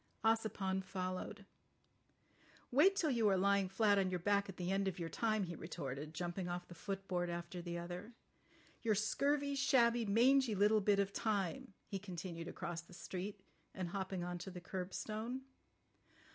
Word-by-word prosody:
Ossipon 215 -4 +2
followed. 185 +2 -4 1.3
"Wait 325 +10 +6
till 325 -7 +2
you 230 -4 +3
are 190 - +4
lying 200 0 +3
flat 205 +1 +4
on 190 -1 +2
your 180 - 0
back 200 +2 +2
at 190 - -8
the 180 +1 -1
end 195 0 +1
of 190 - -2
your 170 -2 -3
time," 215 0 +1
he 175 -2 -4
retorted, 150 -1 -5
jumping 175 +2 -3
off 175 0 -4
the - - -10
footboard 190 -1 -2
after 175 +1 -4
the 170 0 -4
other. 180 +6 -6 0.7
"Your 220 -2 +2
scurvy, 280 +7 +1
shabby, 240 -4 +4
mangy 245 +2 +5
little 210 +2 +4
bit 205 0 +4
of 200 0 +1
time," 200 -3 -1
he 195 - -4
continued 175 -3 -6
across 170 -1 -4
the 170 +2 -17
street, 190 +3 -5 0.3
and 185 -2 -3
hopping 190 -1 -3
on 175 0 -3
to 190 - -6
the 180 -1 -7
curbstone. 215 +7 -4
195 Hz, 165 wpm, -38 LUFS, 175-215 Hz, 1.3 s, Wait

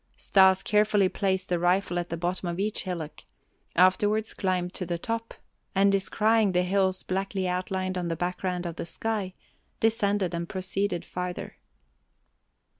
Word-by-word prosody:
Stas 190 -1 +4
carefully 210 -2 +3
placed 190 -1 -1
the 175 -1 +1
rifle 175 0 +1
at 175 - -4
the 170 - -3
bottom 175 +1 -2
of 170 - -3
each 210 +1 -1
hillock; 160 -5 -5 0.5
afterwards 205 +4 +3
climbed 180 -1 -1
to - - -4
the 175 -1 -2
top, 230 +5 -4 0.4
and 195 +1 +5
descrying 210 +1 +2
the 180 0 +3
hills 190 0 +1
blackly 195 0 -2
outlined 185 +1 -2
on 175 - -2
the 165 - -1
background 180 +1 -2
of 170 -1 -5
the - - -4
sky, 200 +1 -3 0.4
descended 205 -4 +1
and 170 0 -3
proceeded 190 -1 -2
farther. 180 0 -5
185 Hz, 150 wpm, -27 LUFS, 180-200 Hz, 0.5 s, and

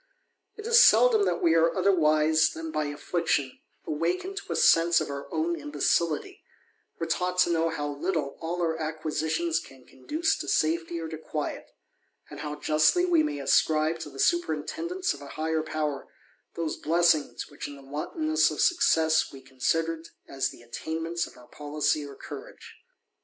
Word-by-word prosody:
It 430 - -9
is 470 +1 +7
seldom 455 -5 +5
that - - -1
we 170 - +4
ar^ 165 0 +3
otherwise, 155 -4 +3
than 160 0 -6
by 155 -1 -1
affliction, 145 -2 -1 0.3
awakened 175 - -2
to 400 - -6
a - - -4
sense 165 +1 +5
of 155 -2 -4
our 140 0 -7
own 340 +2 0
imbecility, 170 - -1 0.6
or 165 - -1
taught 180 +2 -1
to 175 - +3
know 165 0 +1
how 150 -2 -3
little 145 0 -2
all 175 +2 -2
our 165 -1 0
acquisi 155 0 -3
tions 165 0 0
can 135 -5 -14
conduce 315 - -1
to - - -5
safety 165 +2 0
or 165 - -5
to 160 -1 -7
quiet; 155 -2 -5 0.6
and - - -8
how 150 -1 -4
justly 155 - +3
w^ 340 -3 +3
may 145 - -2
ascribe 155 +3 +2
to 155 - -6
the 135 - -13
superintendence 345 - 0
of 140 - -12
a 140 - -9
higher 160 0 0
power, 155 -3 -3 0.5
thos^ 165 -2 -3
blessings 160 -2 +1
which 145 - -6
in 145 - -9
the 140 - -14
wantonness 310 - 0
of - - -6
success 160 - +3
we 135 - -11
considered 160 +5 -2 0.2
as 135 -1 -1
the 120 - -14
attainments 165 +7 -3
of - - -16
our 125 - -15
policy 150 0 -1
or 140 -1 -9
courage. - - -10
160 Hz, 170 wpm, -27 LUFS, 150-170 Hz, 0.6 s, is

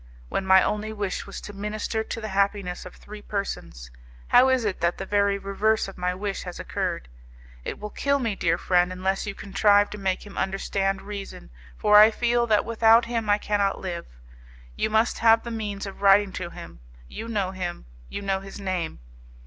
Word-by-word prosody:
When 190 - -2
my 190 0 +7
only 210 +1 -2
wish 205 -3 -3
was 200 - -7
to 205 - -9
minister 210 +2 -3
to 225 - -5
the 220 -1 -5
happiness 195 -2 0
of 180 - -13
three 210 0 -11
persons, 130 - -5 0.4
how 255 +2 +6
is 260 -3 +2
it 200 -3 -2
that 170 0 +1
the 195 - -5
very 200 0 +2
reverse 205 +2 0
of 195 - -9
my 180 0 -1
wish 200 +1 -3
has 180 -1 -7
occurred? - - -3 0.6
It - - -5
will 210 0 -7
kill 280 0 +1
me, 230 -6 -1
dear 170 -2 +1
friend, 180 0 +2
unless 190 +2 -2
you 200 - -4
contrive 205 +1 +3
to 210 - -7
make 190 0 -1
him 205 - -7
understand 195 0 -1
reason, 200 - -8 0.3
for 210 0 +6
I 215 +1 +9
feel 240 +1 +1
that 210 -2 +3
without 230 0 +5
him 230 -2 -2
I 205 - +5
cannot 205 -2 0
live. 175 -3 -5 0.7
You - - 0
must 220 +2 +2
have 225 0 +5
the 235 - -6
means 210 -3 -4
of 195 0 -9
writing 200 0 +5
to 175 -2 -4
him, - - -11 0.3
you 225 - -7
know 205 -5 -1
him, 180 - -5 0.2
you 200 - -5
know 195 -1 0
his 195 +1 -10
name. 185 -4 -3
200 Hz, 195 wpm, -25 LUFS, 190-215 Hz, 0.7 s, I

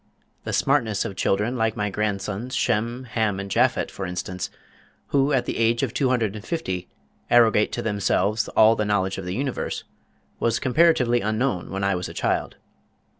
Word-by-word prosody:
The - - -3
smartness 115 -8 +1
of 100 -4 -5
children 105 +6 0
like 110 -1 0
my 105 -1 -1
grandsons, 105 +4 -2
Shem, 120 +1 0
Ham 110 -5 -1
and 100 0 -6
Japhet, 125 +5 +2
for 95 - -5
instance, 90 0 -4 0.6
who 140 +1 +2
at 130 -3 +2
the - - -3
age 115 +2 +2
of 125 - -1
two 135 -3 +1
hundred 115 -5 0
and 105 - -8
fifty 95 - -3 0.4
arrogate 110 -3 +4
to - - -3
themselves 105 0 +1
all 110 +1 +7
the 105 - 0
knowledge 95 -2 0
of 95 - -6
the 90 +1 -3
universe, 135 +1 -3 0.6
was 115 - +1
comparatively 130 -4 +3
unknown 110 -2 -1
when 95 0 -3
I 100 0 +2
was 90 -1 -3
a - - -10
child. - - -1
110 Hz, 175 wpm, -24 LUFS, 100-120 Hz, 0.6 s, all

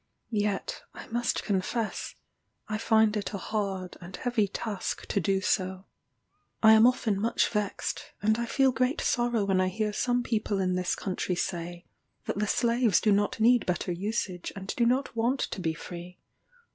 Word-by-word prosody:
Yet, 210 - -1
I - - -8
must 240 +1 0
confess, 210 +3 -2 0.5
I 215 -1 -2
find 220 -1 +3
it 210 0 -3
a - - -1
hard 195 -3 -3
and 180 +1 -8
heavy 240 -4 0
task 200 0 -4
to 200 - 0
do 195 +2 +1
so. 190 0 -1 0.8
I 220 0 +9
am 220 +2 +7
often 220 -5 +1
much 230 +2 +2
vexed, 210 -2 -3
and 220 +2 +2
I 235 - -2
feel 265 +2 +3
great 255 +5 0
sorrow 240 -4 +1
when 190 -1 +2
I 185 - +2
hear 210 +3 -1
some 245 +3 +1
people 215 -3 -1
in 185 -1 +1
this 180 0 0
country 185 -1 -2
say, 175 0 -4 0.4
that - - -2
the 210 - 0
slaves 235 -1 +3
do 215 - +2
not 205 +2 +1
need 240 +2 +4
better 180 0 -1
usage, 185 -1 -3
and 195 -1 -5
do 235 -2 +3
not 255 +1 0
want 240 +4 +1
to 190 - -3
be 160 -2 -1
free. 175 +2 -9
210 Hz, 175 wpm, -28 LUFS, 185-235 Hz, 0.8 s, I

